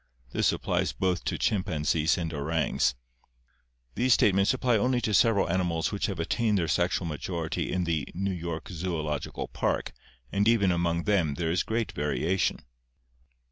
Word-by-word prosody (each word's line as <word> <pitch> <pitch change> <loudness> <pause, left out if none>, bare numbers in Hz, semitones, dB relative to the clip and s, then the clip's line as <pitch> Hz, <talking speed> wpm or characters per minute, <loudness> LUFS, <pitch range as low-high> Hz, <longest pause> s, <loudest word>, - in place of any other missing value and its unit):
This - - +2
applies - - -1
both 90 -1 -1
to - - -1
chimpanzees 80 -5 +1
and 85 -2 -3
orangs. 70 -4 0 1.0
These 125 - +3
statements 100 -1 +3
apply 130 -2 +1
only 125 +3 +2
to 110 - -1
several 100 -1 +4
animals 85 -2 0
which 100 - -1
have 95 -5 -4
attained 105 +5 +1
their 85 -3 0
sexual 90 +3 +1
majority 80 +1 -3
in 90 -1 0
the 80 -4 -1
[New 95 +2 -1
York 85 -2 -5
Zoological] 80 -4 -3
Park - - -1 0.4
and 100 +2 +1
even 105 -5 +4
among 85 -1 0
them 90 -9 +1
there 80 0 -1
is 90 0 +2
great 115 0 -2
variation." 80 +5 -1
90 Hz, 150 wpm, -28 LUFS, 80-100 Hz, 1.0 s, several